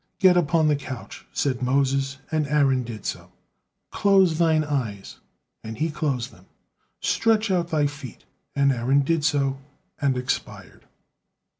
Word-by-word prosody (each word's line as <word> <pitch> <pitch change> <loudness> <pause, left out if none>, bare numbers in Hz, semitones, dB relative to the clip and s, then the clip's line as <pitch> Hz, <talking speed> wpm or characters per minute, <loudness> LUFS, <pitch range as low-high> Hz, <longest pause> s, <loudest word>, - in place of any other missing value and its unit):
"Get 185 -2 +5
upon 165 -2 +3
the 150 - +3
couch," 130 -3 -8
said 130 -3 -1
Moses, 135 +1 +1
and 155 -2 0
Aaron 135 -3 +2
did 115 -4 -8
so. - - -5 0.6
"Close 190 -5 +3
thine 160 -2 +3
eyes," 125 -10 -4 0.5
and 110 0 -7
he 160 +1 -1
closed 140 -5 -2
them. 95 +2 -20 0.5
"Stretch 220 -2 +2
out 175 -2 +1
thy 155 -3 +1
feet," 145 -5 -7 0.3
and 140 0 +3
Aaron 130 +3 +2
did 160 +2 0
so, 140 -2 +1 0.4
and 135 -3 +1
expired. 125 0 -5
140 Hz, 140 wpm, -24 LUFS, 130-160 Hz, 0.6 s, Get